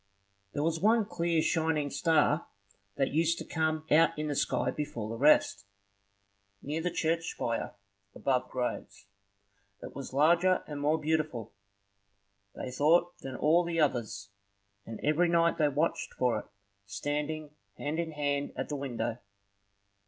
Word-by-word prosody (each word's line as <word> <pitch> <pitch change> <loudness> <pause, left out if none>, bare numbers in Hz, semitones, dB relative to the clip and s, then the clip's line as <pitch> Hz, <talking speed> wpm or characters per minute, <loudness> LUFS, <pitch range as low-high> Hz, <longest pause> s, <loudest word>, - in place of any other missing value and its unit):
There 145 - -1
was 165 0 0
one 220 +3 +3
clear 170 -5 0
shining 160 -3 0
star 155 +1 +2 0.5
that 135 -1 0
used 165 +2 +2
to - - -6
come 155 -1 -1
out 165 +1 +5
in 150 0 -2
the 145 - -1
sky 125 -1 0
before 145 -8 -4
the 115 - -4
rest, 115 -7 +4 1.0
near 150 +3 -2
the 180 - 0
church 165 0 -1
spire, 115 -1 -3 0.4
above 130 -2 0
the - - -24
graves. 125 -5 -4 0.8
It - - -8
was 140 - -6
larger 170 +6 +3
and 145 -1 -6
more 150 +2 +2
beautiful, 155 -7 -1 1.0
they 125 - -5
thought, 165 +7 +2
than 135 -1 -7
all 165 +6 +3
the 170 -1 -2
others, 115 -9 0 0.6
and 115 -1 -7
every 155 +4 +3
night 170 0 +2
they 150 -1 +4
watched 150 +4 -1
for 125 -2 +1
it, - - -11 0.4
standing 145 +8 -3 0.3
hand 150 +3 -3
in 165 -2 -3
hand 145 -1 -1
at 130 - -4
the 150 - -2
window. 120 -4 -3
150 Hz, 150 wpm, -30 LUFS, 135-165 Hz, 1.0 s, out